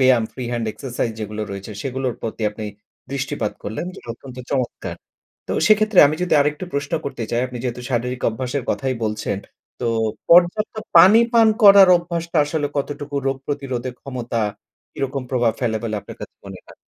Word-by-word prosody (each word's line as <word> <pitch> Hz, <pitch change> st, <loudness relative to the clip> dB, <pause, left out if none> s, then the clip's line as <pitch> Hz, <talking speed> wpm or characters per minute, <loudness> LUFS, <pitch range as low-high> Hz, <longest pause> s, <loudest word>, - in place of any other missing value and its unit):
ব্যায়াম 130 Hz, -3 st, +5 dB
free 130 Hz, -, -6 dB
hand 120 Hz, -2 st, -2 dB
exercise 120 Hz, +1 st, -3 dB
যেগুলো 105 Hz, 0 st, -4 dB
রয়েছে 100 Hz, +2 st, -7 dB
সেগুলোর 130 Hz, -2 st, -2 dB
প্রতি 115 Hz, 0 st, -4 dB
আপনি 110 Hz, +1 st, -7 dB, 0.5 s
দৃষ্টিপাত 135 Hz, -6 st, -2 dB
করলেন। 110 Hz, +11 st, -4 dB
জি -, -, -11 dB
অত্যন্ত 130 Hz, +1 st, -12 dB
চমৎকার! 130 Hz, -3 st, -2 dB, 0.5 s
তো -, -, -3 dB
সেক্ষেত্রে 215 Hz, -1 st, +4 dB
আমি 150 Hz, -, -1 dB
যদি 180 Hz, -, +1 dB
আরেকটু 150 Hz, +4 st, 0 dB
প্রশ্ন 140 Hz, 0 st, -3 dB
করতে 130 Hz, -5 st, -4 dB
চাই, 120 Hz, 0 st, +1 dB
আপনি 125 Hz, -1 st, -8 dB
যেহেতু 125 Hz, -1 st, -3 dB
শারীরিক 125 Hz, +1 st, -2 dB
অভ্যাসের 125 Hz, +4 st, -3 dB
কথাই 130 Hz, -1 st, -1 dB
বলছেন 105 Hz, -2 st, -2 dB, 0.4 s
তো 120 Hz, -, -1 dB, 0.4 s
পর্যাপ্ত 180 Hz, +6 st, +5 dB, 0.2 s
পানি 210 Hz, +5 st, +9 dB
পান 230 Hz, -2 st, +6 dB
করার 200 Hz, -2 st, +9 dB
অভ্যাসটা 170 Hz, -1 st, -4 dB
আসলে 145 Hz, 0 st, -1 dB
কতটুকু 145 Hz, +1 st, -4 dB
রোগ 135 Hz, 0 st, +1 dB
প্রতিরোধে 130 Hz, -3 st, -3 dB
ক্ষমতা 120 Hz, -3 st, -4 dB, 0.5 s
কিরকম 135 Hz, 0 st, -3 dB
প্রভাব 120 Hz, -3 st, +2 dB
ফেলে 115 Hz, -3 st, 0 dB
বলে 115 Hz, -2 st, -3 dB
আপনার -, -, -11 dB
কাছে -, -, -8 dB
মনে -, -, -8 dB
হয়? -, -, -16 dB
130 Hz, 165 wpm, -21 LUFS, 120-150 Hz, 0.5 s, পানি